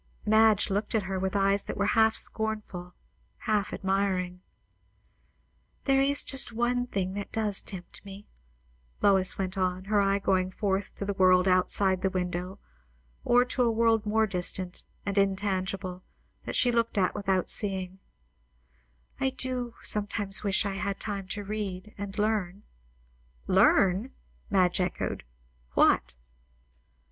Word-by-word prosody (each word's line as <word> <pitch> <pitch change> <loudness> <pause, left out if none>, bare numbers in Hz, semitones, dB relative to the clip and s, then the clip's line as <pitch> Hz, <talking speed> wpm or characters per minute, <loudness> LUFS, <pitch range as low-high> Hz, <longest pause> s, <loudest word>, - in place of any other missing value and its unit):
Madge 215 -1 +4
looked 205 +3 -1
at 215 - +1
her, 190 0 -3
with 190 +1 -2
eyes 195 0 +2
that - - -5
were 200 - +1
half 220 +1 +3
scornful, 210 -5 -2 0.4
half 210 -3 -1
admiring. 190 -2 -1 1.4
"There 270 -1 +3
is 280 +1 +2
just 270 -3 +1
one 245 +2 0
thing 190 -4 -2
that 200 0 -6
does 210 -3 +1
tempt 185 -3 -10
me," 200 +1 -11 0.8
Lois 190 -2 +4
went 190 0 -3
on, 185 0 -1
her 205 0 +2
eye 195 0 +2
going 185 -2 +1
forth 195 +1 -2
to 200 - -4
the 200 - -2
world 185 -1 +4
outside 185 0 +3
the 190 - +1
window, 180 0 -3 0.7
or 245 +1 +4
to 250 +1 -2
a 240 - +3
world 225 -1 +2
more 220 +1 +2
distant 180 -1 -1 0.2
and 200 0 0
in 195 -1 +2
tangible, 190 -2 -3 0.4
that - - -4
she 245 - +3
looked 230 -2 0
at 185 -2 +2
without 195 -3 0
seeing, 190 -2 -1 1.2
"I 270 - +1
do 250 -2 -5
sometimes 205 -1 0
wish 200 +1 0
I 195 -1 -3
had 200 0 -3
time 200 -3 -5
to 205 +2 -5
read 205 -1 -5
and 200 0 -7
learn." 205 -2 -1 0.8
"Learn!" 195 - +3 0.4
Madge 185 -2 +2
echoed. 180 - -3 0.5
"What?" 65 0 +3
200 Hz, 140 wpm, -28 LUFS, 185-215 Hz, 1.4 s, Madge